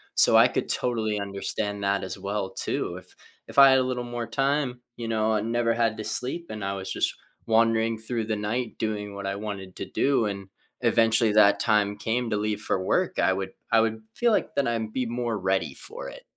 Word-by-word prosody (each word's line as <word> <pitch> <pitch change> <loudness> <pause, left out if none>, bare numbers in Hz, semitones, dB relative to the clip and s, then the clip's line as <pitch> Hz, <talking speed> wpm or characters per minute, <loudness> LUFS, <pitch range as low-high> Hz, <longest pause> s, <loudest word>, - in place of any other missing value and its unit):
so - - +6
I - - +8
could - - -2
totally 110 -4 0
understand 100 +1 -3
that 100 0 +1
as 95 - -5
well 100 0 -3
too. - - -3
If - - -14 0.4
if - - -11
I 135 -1 +10
had 130 - +5
a - - +2
little 125 -1 -2
more 120 -1 -4
time, 135 -2 0 0.2
you 115 -1 -5
know, 110 0 +1
and 110 +2 -1
never 120 -1 +2
had 115 -2 +1
to 110 - -4
sleep, 170 +7 -3
and 105 -2 -6
I 100 0 -1
was 95 -1 -5
just - - 0 0.3
wandering 115 0 +2
through 110 0 -3
the 110 - 0
night 110 +3 -3
doing 105 -2 -3
what 100 -1 -6
I 100 - -2
wanted 100 -3 -6
to - - -4
do, 135 -5 +1
and 100 -1 -5 0.3
eventually 115 -1 +3
that 105 -1 +6
time 105 -2 +2
came 115 +3 -1
to 105 - 0
leave 105 0 -2
for 95 - -1
work, - - 0
I 95 - +3
would 95 0 -4 0.2
I 115 -1 +6
would 110 0 -1
feel 240 -1 +2
like - - 0
that 140 -3 +1
I'd 110 -2 -2
be 130 -1 -1
more 120 -1 -2
ready 95 0 0
for - - -8
it. - - -12
110 Hz, 220 wpm, -26 LUFS, 100-120 Hz, 0.4 s, I